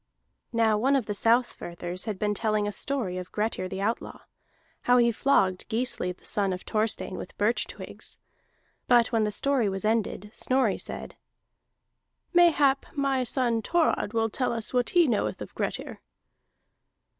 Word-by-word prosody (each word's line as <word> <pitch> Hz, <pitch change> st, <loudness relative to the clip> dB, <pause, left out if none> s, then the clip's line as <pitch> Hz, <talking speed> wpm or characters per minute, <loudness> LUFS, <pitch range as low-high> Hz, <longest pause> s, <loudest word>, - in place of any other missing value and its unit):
Now 225 Hz, -2 st, +2 dB
one 270 Hz, +5 st, +3 dB
of 265 Hz, -5 st, +1 dB
the 210 Hz, -, -2 dB
Southfirthers 185 Hz, -6 st, 0 dB
had 215 Hz, -4 st, -3 dB
been 210 Hz, +1 st, 0 dB
telling 215 Hz, -1 st, 0 dB
a -, -, -1 dB
story 205 Hz, -7 st, -2 dB
of 180 Hz, -, -8 dB
Grettir 210 Hz, -3 st, -1 dB
the 190 Hz, +1 st, -4 dB
Outlaw, 225 Hz, +3 st, -3 dB, 0.6 s
how 245 Hz, 0 st, +4 dB
he 235 Hz, -1 st, +4 dB
flogged 195 Hz, -7 st, +1 dB
Gisli 225 Hz, -5 st, 0 dB
the 180 Hz, -, -14 dB
son 200 Hz, -2 st, 0 dB
of 180 Hz, 0 st, -4 dB
Thorstein 215 Hz, -3 st, -1 dB
with -, -, -9 dB
birch 215 Hz, +4 st, +1 dB
twigs. -, -, -9 dB, 0.7 s
But 240 Hz, -1 st, +4 dB
when 225 Hz, -2 st, +2 dB
the 210 Hz, -, -1 dB
story 255 Hz, -1 st, +1 dB
was 195 Hz, +2 st, -3 dB
ended, 215 Hz, -2 st, -1 dB
Snorri 255 Hz, -6 st, +1 dB
said: -, -, -6 dB, 1.2 s
"Mayhap 300 Hz, -6 st, +4 dB
my 275 Hz, -2 st, +1 dB
son 240 Hz, -2 st, 0 dB
Thorod 320 Hz, -8 st, +1 dB
will 225 Hz, -1 st, +1 dB
tell 250 Hz, +1 st, -1 dB
us 230 Hz, +1 st, -4 dB
what 245 Hz, -1 st, +1 dB
he 350 Hz, -2 st, +5 dB
knoweth 225 Hz, -5 st, 0 dB
of -, -, -8 dB
Grettir." -, -, -4 dB
225 Hz, 155 wpm, -27 LUFS, 205-255 Hz, 1.2 s, he